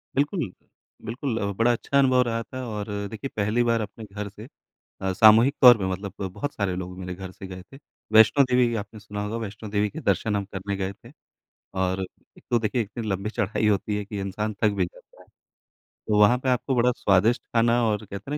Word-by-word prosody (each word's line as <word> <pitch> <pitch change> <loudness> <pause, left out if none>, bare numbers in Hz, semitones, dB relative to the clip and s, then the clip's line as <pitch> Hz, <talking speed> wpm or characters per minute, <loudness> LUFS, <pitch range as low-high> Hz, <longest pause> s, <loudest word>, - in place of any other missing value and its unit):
बिल्कुल, 145 +7 +1 0.7
बिल्कुल 115 +1 -3
अ, 100 0 -1
बड़ा 115 +4 +3
अच्छा 130 +4 -1
अनुभव 130 -2 +4
रहा 115 -1 -2
था 130 +2 -7
और 105 -2 -4 0.3
देखिए, 110 +5 -5
पहली 105 +4 +1
बार 115 -1 +1
अपने 105 +2 -7
घर 105 0 -6
से 105 +4 -12 0.5
अ, 95 0 -1
सामूहिक 110 +7 +6
तौर 120 -3 +10
पे 95 - -2
मतलब 95 +1 -4 0.2
बहुत 145 +8 -4
सारे 100 -3 -1
लोग 90 0 -6
मेरे 90 -1 -5
घर 95 0 -8
से 95 - -10
गए 90 -1 -8
थे। 135 - -11 0.3
वैष्णो 110 +6 +7
देवी, 125 -1 +3
आपने 110 0 -6
सुना 105 0 -6
होगा 105 +2 -3
वैष्णो 110 -1 -6
देवी 105 0 +1
के 160 - -7
दर्शन 105 - 0
हम 100 - -1
करने 100 +1 -3
गए 95 0 -3
थे। - - -17 0.7
और 95 +1 0 0.4
एक - - -18
तो 120 - +3
देखिए 115 +2 0
इतनी 115 +2 -6
लंबी 100 +1 -2
चढ़ाई 110 -1 -1
होती 105 0 +1
है 105 - -4
कि 105 0 -6
इंसान 105 +3 -3
थक 105 - +6
भी 90 - +2
जाता - - -16
है। - - -20 0.8
तो 105 - +2
वहाँ 105 +4 +6
पे 130 - -1
आपको 130 +1 0
बड़ा 125 +1 +3
स्वादिष्ट 100 +5 +3
ख़ाना 120 +1 +2
और 105 0 -1
कहते 100 - -9 0.2
हैं 150 - -1
105 Hz, 215 wpm, -25 LUFS, 100-120 Hz, 0.8 s, तौर